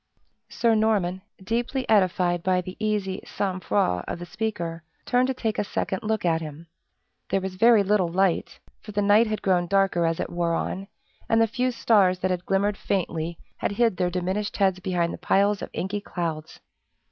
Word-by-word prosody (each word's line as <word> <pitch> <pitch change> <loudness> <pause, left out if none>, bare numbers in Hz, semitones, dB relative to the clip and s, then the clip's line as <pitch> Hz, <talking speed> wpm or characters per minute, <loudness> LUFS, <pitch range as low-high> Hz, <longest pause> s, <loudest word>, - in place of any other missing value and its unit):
Sir 230 -1 +2
Norman, 205 -4 +1 0.2
deeply 240 +5 -2
edified 180 -4 +2
by 185 +1 +2
the 185 0 -6
easy 210 -3 -1
sang 190 -2 -3
froid 175 - 0
of - - -3
the 175 - -7
speaker, 175 -6 -4 0.2
turned 250 0 +2
to 265 - 0
take 220 -4 -2
a - - +2
second 190 -1 -3
look 220 -2 -1
at 165 -1 +2
him. 155 +1 -8 0.6
There 195 - +2
was 190 0 -5
very 225 +2 +5
little 195 -2 +2
light; 185 +1 0 0.2
for 210 - -10
the 205 0 +1
night 210 +3 +5
had 215 0 -3
grown 180 -2 +2
darker 190 -3 +2
as 165 0 -1
it - - -3
wore 170 -1 0
on, 195 +3 -3 0.4
and 225 - +4
the 225 - +5
few 250 +3 -1
stars 210 -6 +3
that 185 - +1
had 180 0 -3
glimmered 200 +1 +1
faintly 170 -3 -2 0.2
had - - -2
hid 230 -3 +2
their 180 -1 +1
diminished 185 +4 -2
heads 190 -2 +2
behind 175 -2 -1
the - - -8
piles 200 +3 +2
of - - -5
inky 200 +3 -3
clouds. 165 -5 -5
190 Hz, 190 wpm, -25 LUFS, 175-215 Hz, 0.6 s, very